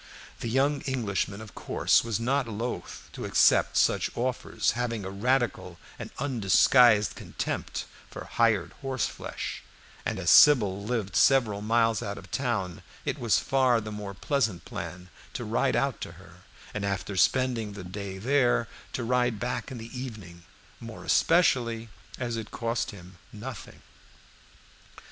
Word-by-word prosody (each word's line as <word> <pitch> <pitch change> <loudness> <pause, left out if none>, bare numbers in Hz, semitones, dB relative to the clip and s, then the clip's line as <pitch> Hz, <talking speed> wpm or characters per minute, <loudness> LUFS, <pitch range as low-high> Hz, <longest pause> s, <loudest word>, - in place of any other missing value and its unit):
The 115 - -3
young 135 +3 +2
Englishman, 105 -5 -2
of 110 - -11
course, - - +2
was 115 -2 -2
not 130 +2 0
loath 115 +3 -5
to - - -7
accept - - +4
such - - +3
offers, 125 +1 0
having 115 -4 -3
a 95 - -5
radical 120 +3 0 0.2
and - - -6
undisguised 120 -3 +4
contempt - - -4 0.2
for - - -8
hired 110 -6 +1
horseflesh, 135 -2 -4 0.4
and - - -2
as 85 -2 +2
Sybil 105 -9 +6
lived 105 -5 -2
several 110 -5 +4
miles 115 0 +2
out 100 0 -4
of - - -12
town, 110 -10 -2 0.2
it - - -2
was 115 -3 +3
far 130 -3 +2
the 110 -1 -6
most 100 -2 -7
pleasant 115 - 0
plan 90 0 -7 0.2
to - - -4
ride - - +1
out - - 0
to - - -6
her, - - -16 0.4
and 105 - -3
after 100 0 -2
spending 120 -1 +1
the 100 -2 -8
day 95 +1 -6
there, 120 +1 +2 0.3
to 125 - -2
ride 120 -2 +1
back 120 +1 -3
in 130 - -7
the 115 +2 -9
evening, 105 -9 -8 0.3
more 115 -1 -9
especially 120 -9 +2 0.3
as 120 -2 -3
it 110 -2 -6
cost 115 0 -2
him 90 -3 -12
nothing. 115 +1 -9
115 Hz, 145 wpm, -28 LUFS, 100-125 Hz, 0.4 s, Sybil